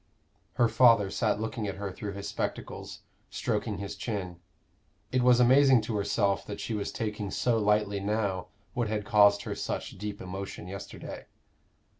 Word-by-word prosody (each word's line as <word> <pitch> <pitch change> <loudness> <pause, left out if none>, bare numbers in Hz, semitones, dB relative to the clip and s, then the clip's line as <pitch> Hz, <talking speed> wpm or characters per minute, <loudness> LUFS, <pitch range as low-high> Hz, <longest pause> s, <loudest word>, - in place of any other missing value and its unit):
Her 120 -2 +3
father 115 -3 +5
sat 105 -2 +1
looking 110 -1 -3
at 95 - -3
her 100 0 -4
through 100 +2 -6
his 100 0 -6
spectacles, - - -5 0.3
stroking 105 -3 -2
his 100 0 -5
chin. 95 -4 -4 0.7
It 130 - +2
was 125 0 +5
amazing 130 0 +6
to 110 +1 -3
herself 100 -1 +1
that 105 - -6
she 115 - -3
was 105 -2 -2
taking 105 -2 -3
so 115 +3 +1
lightly 105 -1 +2
now 100 -2 -1 0.3
what 120 -2 0
had 105 -1 -2
caused 100 -1 +5
her - - -3
such - - -4
deep 105 0 -5
emotion 95 -1 -6
yesterday. 100 +1 -8
105 Hz, 160 wpm, -29 LUFS, 100-115 Hz, 0.7 s, amazing